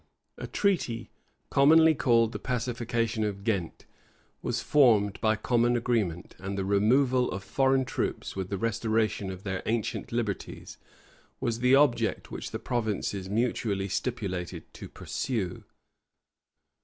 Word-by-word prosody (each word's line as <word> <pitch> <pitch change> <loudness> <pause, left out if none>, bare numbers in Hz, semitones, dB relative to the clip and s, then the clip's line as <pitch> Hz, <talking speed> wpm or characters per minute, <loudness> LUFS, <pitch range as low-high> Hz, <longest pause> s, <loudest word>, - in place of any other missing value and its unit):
A - - -5
treaty, 165 - -1 0.4
commonly 160 +3 +6
called 115 -6 +3
the - - -5
Pacification 120 -2 -1
of 100 -2 -3
Ghent, 100 -7 -2 0.6
was - - -1
formed 110 -9 +3
by 110 -1 +3
common 120 +2 +2
agreement; 110 -8 -1
and 95 +1 -5
the 95 - -1
removal 125 +6 +3
of 95 +1 -5
foreign 135 +5 +2
troops, - - -3
with 95 -1 -4
the 100 - -2
restoration 110 -2 0
of 95 0 -7
their 95 -2 -3
ancient 115 -1 -2
liberties, 115 -4 -4 0.6
was 115 -1 -1
the 125 +2 +5
object 140 -3 +2
which - - -5
the - - -4
provinces 105 -5 -2
mutually 105 -3 -1
stipulated 95 -6 -3
to - - -9
pursue. 105 -9 -4
115 Hz, 130 wpm, -28 LUFS, 100-125 Hz, 0.6 s, commonly